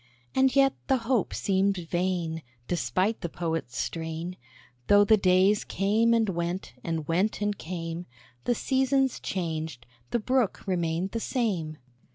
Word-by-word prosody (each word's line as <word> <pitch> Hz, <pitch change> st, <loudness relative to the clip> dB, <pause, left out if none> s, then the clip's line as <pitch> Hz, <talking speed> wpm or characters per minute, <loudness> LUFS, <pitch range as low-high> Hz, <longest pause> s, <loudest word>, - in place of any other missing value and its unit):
And 265 Hz, 0 st, +3 dB
yet 275 Hz, -1 st, +5 dB
the 265 Hz, -, +4 dB
hope 240 Hz, -4 st, +1 dB
seemed 195 Hz, 0 st, +1 dB
vain; 175 Hz, -1 st, -1 dB, 0.3 s
Despite 185 Hz, +5 st, 0 dB
the 170 Hz, -, -3 dB
Poet's 165 Hz, -7 st, -3 dB
strain, 165 Hz, +2 st, -3 dB, 0.5 s
Though 205 Hz, 0 st, +7 dB
the 220 Hz, -, +6 dB
days 190 Hz, +1 st, +4 dB
came 220 Hz, +4 st, +2 dB
and 225 Hz, -1 st, +2 dB
went, 175 Hz, -1 st, -3 dB
and 165 Hz, -2 st, -3 dB
went 185 Hz, +6 st, +1 dB
and 205 Hz, 0 st, 0 dB
came, 165 Hz, -1 st, -5 dB, 0.4 s
The 245 Hz, -, +2 dB
seasons 265 Hz, +1 st, +1 dB
changed, 160 Hz, -8 st, -3 dB, 0.2 s
the -, -, +1 dB
Brook 245 Hz, -1 st, 0 dB
remained 175 Hz, 0 st, -1 dB
the 230 Hz, -, -2 dB
same. 190 Hz, -, -1 dB
185 Hz, 140 wpm, -27 LUFS, 165-220 Hz, 0.5 s, Though